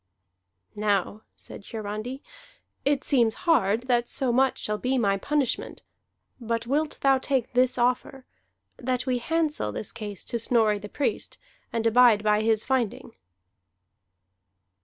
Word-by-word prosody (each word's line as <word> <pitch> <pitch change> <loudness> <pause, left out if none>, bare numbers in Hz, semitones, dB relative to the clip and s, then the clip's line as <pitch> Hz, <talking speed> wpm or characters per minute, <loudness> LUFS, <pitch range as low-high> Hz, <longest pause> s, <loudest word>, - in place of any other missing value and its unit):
"Now," 205 0 0
said - - -10
Hiarandi, 220 +5 -6 0.6
"it 285 0 +1
seems 235 -6 +2
hard 230 - +3
that 240 -2 +1
so 260 -3 -1
much 260 +2 +2
shall 210 0 -3
be 260 +1 0
my 200 -5 +2
punishment. 280 +5 -2 0.6
But 230 -1 -2
wilt 295 +5 -1
thou 270 -1 +4
take 260 -3 -1
this 250 +1 +3
offer, 250 +2 0 0.5
that 255 0 -2
we 255 -2 0
handsel 310 - -1
this 200 - -5
case 210 -4 -5
to 235 - -2
Snorri 220 -3 +2
the 205 +1 -9
Priest, 285 - -2 0.3
and 230 -1 -2
abide 230 -2 +5
by 210 0 +3
his 220 -1 +2
finding?" 250 -2 -2
240 Hz, 135 wpm, -26 LUFS, 215-260 Hz, 0.6 s, abide